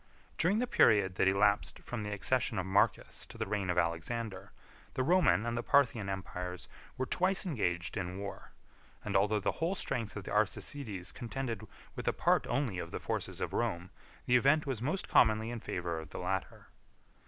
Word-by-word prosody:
During 180 +6 +3
the 245 - +1
period 105 - +4
that - - +3
elapsed 100 +2 +3
from 120 -3 -6
the 105 0 -4
accession 120 +5 0
of 95 - -1
Marcus 95 +2 +1
to - - -12
the - - -1
reign 100 -2 -2
of 90 - 0
Alexander, 95 +5 -2 0.4
the 130 - +1
Roman 175 - +4
and 120 0 -1
the 120 - -1
Parthian 120 -7 +3
empires 90 -2 -5 0.3
were 130 - 0
twice 185 +7 +1
engaged 90 - -1
in 90 -2 -3
war; 100 0 -7 0.5
and - - -2
although 105 +2 +3
the 100 - 0
whole 170 +4 +1
strength 115 - -3
of 100 - -5
the - - -7
Arsacides 105 -1 -1
contended 120 -3 -4 0.3
with - - -6
a - - +3
part - - +2
only 120 -10 -1
of 85 - -5
the - - -5
forces - - -3
of - - -2
Rome, 85 +1 -1 0.3
the 125 - +3
event 145 +5 +4
was 130 -6 -3
most 155 +9 -1
commonly 110 0 +4
in 120 - -4
favor 85 -5 -3
of 80 -1 -9
the - - -8
latter. 95 0 -3
105 Hz, 190 wpm, -32 LUFS, 95-130 Hz, 0.5 s, period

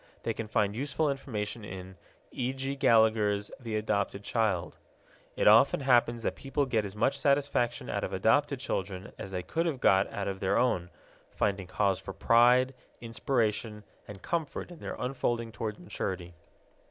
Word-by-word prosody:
They 115 - -1
can 110 0 -5
find 105 -1 +1
useful 145 +4 0
information 110 -5 -4
in 95 -1 -8 0.4
E. 125 0 -2
G. 135 +1 -3
Gallagher's 110 -4 +3
The 115 -4 -4
Adopted 100 -2 -1
Child. 105 -6 -1 0.6
It - - +2
often 115 +7 +6
happens 120 -3 +3
that - - 0
people 140 +1 -1
get 115 -5 0
as 100 0 -7
much 135 +6 +1
satisfaction 140 -4 +1
out - - -2
of - - -3
adopted - - +2
children 95 0 -4
as - - -6
they 90 -1 -4
could 165 - -1
have 145 -6 -2
got 95 -1 +4
out 100 - -3
of 95 -1 -3
their 95 - +1
own, 90 -8 +1 0.4
finding 95 -2 -1
cause 95 0 +1
for 95 0 -8
pride, 120 +6 +4 0.3
inspiration, 115 -2 -1 0.2
and 100 -2 -10
comfort 170 0 -3
in 170 - -11
their - - -5
unfolding 120 -3 -2
toward 105 0 -4
maturity. 90 -2 -5
110 Hz, 165 wpm, -29 LUFS, 100-130 Hz, 0.6 s, often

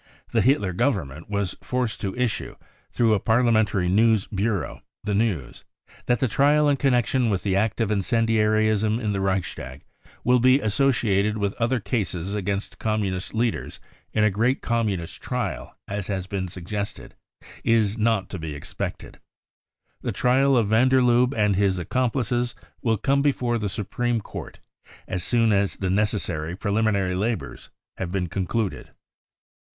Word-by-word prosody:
The - - +3
Hitler 125 -8 +2
Government 85 - -1
was 100 -3 -2
forced 125 -3 -2
to 95 -2 -3
issue, 125 -2 -2 0.3
through 115 -2 +2
a 105 - +2
parliamentary 110 -4 +2
news 110 +2 +3
bureau, 100 0 -2 0.2
the 105 - -1
news: 100 - -1 0.2
" - - -24
That 120 -2 +2
the 130 - +2
trial 145 +5 +3
in 145 -1 +3
connection 125 -2 +2
with 95 -4 -1
the 95 -2 +1
act 105 +3 0
of 110 -2 +1
incendiarism 110 0 +2
in 105 -4 -1
the 100 - -1
Reichstag 85 -8 -3 0.4
will 125 0 +4
be 130 +3 +5
associated 110 -4 +1
with 100 -1 -1
other 120 +2 +2
cases 95 -6 -2
0 105 +1 -2
against 100 +1 -3
Communist 105 -3 -2
leaders 115 0 -1 0.3
in 110 - +1
a 105 - +4
great 115 +7 +1
Communist 105 -8 -1
trial, - - -4
as 100 -1 -4
has 95 -3 -2
been 95 -1 -3
suggested, 100 +4 -5 0.5
is 110 -3 +2
not 110 -4 +1
to 95 - -5
be 80 -2 -5
expected. 75 - -6 0.8
The - - -2
trial 130 +2 +3
of 110 -4 +2
van 115 +4 +4
der 130 0 +4
Lubbe 125 +2 +3
and 105 -2 +3
his 95 -1 +2
accomplices 120 - -1 0.3
will 115 -2 +1
come 140 +6 +2
before 125 -4 +1
the 105 -2 -2
Supreme 115 +4 -1
Court - - -9 0.5
as 90 -2 -3
soon 115 0 +2
as 100 0 +1
the 95 -2 -2
necessary 95 -5 -1
preliminary 100 -2 0
labours 110 +5 -3 0.3
have 85 - -4
been 90 -2 -1
concluded." 100 +3 -2
105 Hz, 155 wpm, -24 LUFS, 95-120 Hz, 0.8 s, be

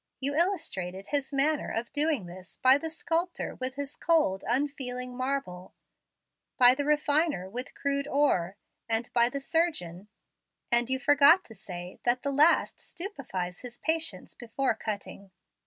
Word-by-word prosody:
You 280 +1 +1
illustrated 200 - -1
His 285 -1 -1
manner 285 +2 +1
of 230 +3 -4
doing 295 - +1
this 180 +1 -11
by 260 +2 +5
the 320 - -4
sculptor 335 +2 -2
with 255 +1 -5
his 285 0 -5
cold, 300 - +1
unfeeling 250 -1 -2
marble, 255 -9 -4 0.8
by 250 0 +8
the 285 +2 -2
refiner 300 - +1
with 245 +7 -7
crude 280 0 -1
ore, 200 -12 +1 0.3
and 225 +1 -1
by 235 0 +4
the 280 - -4
surgeon, 240 - -1 0.6
and 240 +1 +2
you 260 - +1
forgot 290 +5 +5
to 225 - -12
say 180 -3 -9
that 245 +2 +1
the 280 - 0
last 300 +5 +3
stupefies 260 - -5
his 245 -1 -9
patients 320 - -1
before 245 +2 -1
cutting. 200 -2 -6
265 Hz, 145 wpm, -28 LUFS, 220-295 Hz, 0.8 s, by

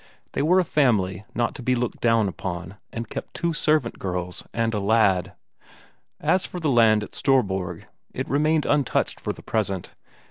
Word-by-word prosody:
They - - -1
were 175 +6 +4
a - - +4
family 105 - +1
not 120 0 0
to 150 - -8
be 125 +1 +1
looked 120 -1 -3
down 115 -3 +3
upon, 90 0 -5
and 115 0 -5
kept - - -7
two 170 -1 0
servant 150 -5 +1
girls 90 -1 -4
and 115 0 0
a 105 - 0
lad. 100 -3 +2 0.9
As 185 - +1
for 180 - -6
the 155 -4 +1
land 110 -3 +5
at - - -10
Storborg, 95 -10 0 0.3
it - - -4
remained 150 +2 +2
untouched 145 -2 +1
for - - -3
the - - -11
present. 100 -5 -2
115 Hz, 175 wpm, -24 LUFS, 95-140 Hz, 0.9 s, land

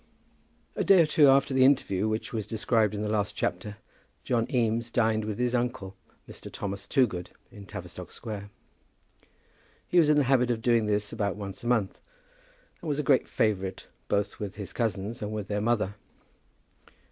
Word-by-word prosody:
A - - 0
day 195 -2 +6
or 165 - +6
two 150 -1 +5
after 135 0 +4
the 130 0 +4
interview 110 -7 +3
which 110 +2 -3
was 110 -2 -3
described 110 -1 +1
in 105 - -3
the - - -1
last 105 -1 -1
chapter 105 +4 -3 0.5
John 115 -2 0
Eames 115 -1 +1
dined 110 -2 +1
with 105 -1 -4
his 125 0 0
uncle 120 -6 -2 0.3
Mr. - - -10
Thomas 100 -1 -5
Toogood, 105 -11 +1 0.2
in 100 -1 -12
Tavistock 90 -3 -8
Square. 105 -3 -7 1.4
He 180 - +4
was 155 -3 +4
in 150 - +5
the 145 - +4
habit 125 -2 +3
of 115 -2 -1
doing 115 -3 +3
this 105 0 -1
about 100 -3 -1
once 100 0 -7
a - - -4
month, 115 -6 0 0.8
and 165 - -5
was 145 - 0
a 150 - -1
great 135 -3 +3
favourite 95 -3 -1 0.2
both 100 0 -1
with 100 -2 -5
his 100 -1 -7
cousins 115 +1 -2
and 105 - -3
with 105 -2 -4
their 105 0 -1
mother. 110 -3 +1
110 Hz, 180 wpm, -28 LUFS, 100-125 Hz, 1.4 s, day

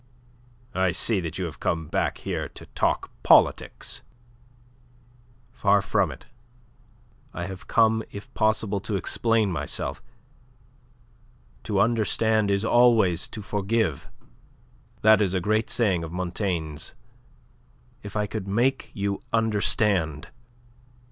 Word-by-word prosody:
"I 95 0 +2
see 100 +4 +1
that 85 -2 -4
you 95 - -2
have 80 -4 -7
come 80 -2 -2 0.2
here - - -4
to - - -11
talk - - -1
politics." - - +3 1.5
"Far 100 -3 +3
from 100 -2 +1
it. 65 - -12 1.1
I 85 - -3
have 95 0 -8
come, 110 -1 +3
if 100 - -10
possible, 110 -2 +1
to 100 +1 -4
explain 110 +1 +1
myself. 85 - -4 1.6
To 105 -3 0
understand 110 -1 +2
is 100 +2 +1
always 115 -8 +4
to 105 - -8
forgive. 105 - -1 0.9
That 110 0 +6
is 95 -2 +1
a - - +2
great 110 +4 0
saying 95 -8 +1
of 80 - -6
Montaigne's. 90 -4 -3 1.1
If 100 0 -9
I 105 -1 +1
could 105 -1 -5
make 120 +7 +1
you 100 -1 -2
understand..." 100 -7 +1
100 Hz, 115 wpm, -25 LUFS, 90-110 Hz, 1.6 s, That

